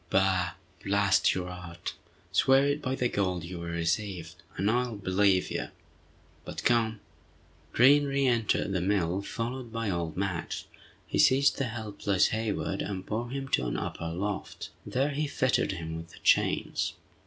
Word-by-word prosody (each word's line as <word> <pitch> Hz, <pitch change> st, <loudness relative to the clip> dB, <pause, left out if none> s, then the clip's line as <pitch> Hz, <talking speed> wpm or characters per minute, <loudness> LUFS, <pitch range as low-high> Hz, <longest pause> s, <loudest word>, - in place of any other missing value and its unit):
"Bah! 95 Hz, -2 st, +2 dB, 0.3 s
blast 100 Hz, 0 st, +3 dB
your 90 Hz, -1 st, -3 dB
art! 90 Hz, -1 st, -7 dB, 0.4 s
Swear 135 Hz, +1 st, +5 dB
it 145 Hz, +1 st, 0 dB
by 130 Hz, -1 st, -1 dB
the 125 Hz, -, +1 dB
gold 90 Hz, -6 st, -1 dB
you 85 Hz, 0 st, -6 dB
will 85 Hz, -, -5 dB
receive, 85 Hz, 0 st, -2 dB, 0.2 s
and 100 Hz, +4 st, +2 dB
I'll 120 Hz, -1 st, 0 dB
believe 95 Hz, -1 st, +2 dB
you. -, -, -2 dB, 0.8 s
But -, -, -6 dB
come!" 115 Hz, -3 st, +2 dB, 0.7 s
Green 145 Hz, +4 st, +6 dB
reëntered 130 Hz, -7 st, +1 dB
the 95 Hz, -2 st, 0 dB
mill 95 Hz, -1 st, +1 dB
followed 120 Hz, +3 st, -4 dB
by 115 Hz, -3 st, -2 dB
old 85 Hz, -2 st, -3 dB
Madge. 95 Hz, -3 st, -2 dB, 0.4 s
He -, -, -2 dB
seized 140 Hz, +3 st, +5 dB
the 135 Hz, -, +1 dB
helpless 105 Hz, -4 st, 0 dB
Hayward 110 Hz, -3 st, -2 dB
and 95 Hz, -2 st, -4 dB
bore 115 Hz, +3 st, -3 dB
him 135 Hz, +1 st, -4 dB
to 65 Hz, -, +1 dB
an -, -, -2 dB
upper 85 Hz, -, -4 dB
loft. 95 Hz, +4 st, -4 dB, 0.2 s
There 135 Hz, +3 st, +1 dB
he 150 Hz, +2 st, -1 dB
fettered 130 Hz, -6 st, +1 dB
him 80 Hz, -2 st, -5 dB
with 85 Hz, 0 st, -8 dB
the -, -, -15 dB
chains. -, -, +2 dB
100 Hz, 155 wpm, -29 LUFS, 90-120 Hz, 0.8 s, Green